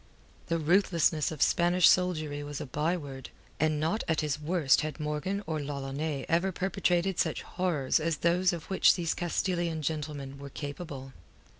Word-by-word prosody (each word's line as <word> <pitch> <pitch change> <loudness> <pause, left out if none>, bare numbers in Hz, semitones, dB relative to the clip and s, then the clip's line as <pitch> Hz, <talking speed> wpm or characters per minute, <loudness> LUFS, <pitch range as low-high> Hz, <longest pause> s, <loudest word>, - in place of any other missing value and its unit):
The 165 - +1
ruthlessness 165 -2 +2
of 155 - +1
Spanish 175 0 +4
soldiery 155 -5 +2
was 145 -1 -5
a 150 - -4
byword, 145 -1 -3 0.3
and 155 -1 +2
not 165 +8 0
at 160 -2 +1
his 150 -1 -2
worst 150 -4 +3
had 155 +1 -4
Morgan 155 +7 -2
or 155 -2 -2
L'Ollonais 140 +1 -3
ever 175 +3 +2
perpetrated 185 -1 0
such - - 0
horrors 170 -8 0
as 160 0 -1
those 180 +2 +2
of 170 -2 -6
which 190 - +5
these 170 -3 -1
Castilian 175 -2 -1
gentlemen 145 -3 -4
were 140 0 -8
capable. 140 -2 -7
155 Hz, 155 wpm, -29 LUFS, 145-175 Hz, 0.3 s, which